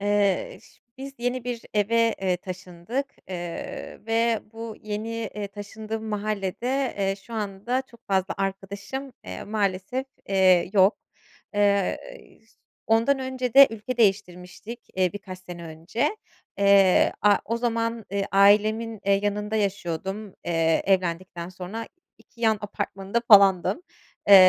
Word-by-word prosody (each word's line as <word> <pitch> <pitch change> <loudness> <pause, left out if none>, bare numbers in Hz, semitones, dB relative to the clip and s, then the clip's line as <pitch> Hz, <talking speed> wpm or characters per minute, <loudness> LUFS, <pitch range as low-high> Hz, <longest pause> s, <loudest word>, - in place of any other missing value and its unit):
Eee, 205 - +1
ş - - -22 0.2
biz 275 +1 -7
yeni 245 0 -2
bir 245 -2 -4
eve, 230 +2 +3
eee, 185 -2 +2
taşındık, 185 +8 -5 0.2
eee, 175 -2 -6
ve 230 0 +2
bu 225 -1 -7
yeni, 215 +1 -4 0.2
eee, 205 -1 -4
taşındığım 215 +2 -6
mahallede, 215 +5 -2
eee, 195 -1 +1
şu 230 +4 -11
anda 215 +4 -2
çok 235 -2 -17
fazla 190 -1 +1
arkadaşım, 200 +7 -4
eee, 90 0 -7
maalesef, 205 +4 -1 0.2
eee, 185 -2 +4
yok. 195 0 +5 0.6
Eee, 200 -2 +2 0.9
ondan 230 +5 +3
önce 260 -2 -3
de 275 0 +11
ülke 225 +3 -5
değiştirmiştik, 200 +1 -1 0.2
eee, 185 -2 +2
birkaç 190 -2 -8
sene 175 -2 -9
önce. 170 - -2 0.4
Eee, 200 -2 +5
a 205 -1 +6
o 230 - -1
zaman, 230 -1 -1
eee, 200 0 0
ailemin, 215 +3 +4
eee, 200 0 +4
yanında 210 +1 -1
yaşıyordum, 195 0 -3
eee, 165 -1 +2
evlendikten 180 -2 0
sonra 185 +5 -7 0.3
2 235 - -22
yan 220 -2 +3
apartmanında 200 +1 -3
falandım. 200 - +6 0.5
Eee, 200 - +10
205 Hz, 125 wpm, -25 LUFS, 190-230 Hz, 0.9 s, de